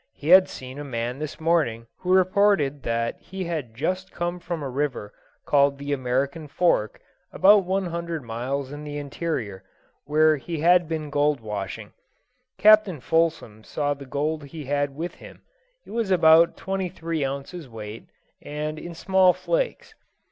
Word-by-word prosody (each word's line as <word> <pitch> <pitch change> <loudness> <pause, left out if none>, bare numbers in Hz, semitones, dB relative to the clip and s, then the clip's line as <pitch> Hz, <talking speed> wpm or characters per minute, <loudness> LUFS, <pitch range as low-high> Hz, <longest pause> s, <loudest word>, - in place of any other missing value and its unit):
He 150 - -6
had 185 +1 +8
seen 130 +2 -8
a - - -5
man 125 -1 -4
this 155 -1 -6
morning 155 -9 +1
who 180 - -2
reported 185 -6 +3
that 115 -1 -2
he 190 +2 -6
had 155 -10 -4
just 185 +8 -2
come 175 +1 -3
from 170 -3 -5
a - - -3
river 130 -6 -3 0.3
called 140 -1 +3
the 140 +1 -3
American 140 +4 -1
Fork, 140 - +1 0.3
about 200 0 +5
one 190 +1 0
hundred 170 -3 -4
miles 130 +4 -4
in 145 +1 -7
the 145 -1 -6
interior, 125 - -4 0.4
where 155 +1 +4
he 165 +4 -5
had 175 0 +5
been 155 -2 -4
gold 145 -1 +2
washing. 105 -1 -6 0.7
Captain 215 -6 +5
Fulsom 155 -6 0
saw 145 +3 -1
the 140 -1 -11
gold 150 +3 -2
he 150 +1 -9
had 145 0 -1
with 170 +4 -4
him; - - -14 0.4
it - - -13
was 225 -2 -1
about 165 -2 +5
twenty 190 -1 -3
three 165 -3 -3
ounces 140 +3 -5
weight, 110 -1 -9 0.3
and 150 +1 -4
in 170 +1 -8
small 190 +1 +4
flakes. - - -2
150 Hz, 160 wpm, -24 LUFS, 135-175 Hz, 0.7 s, had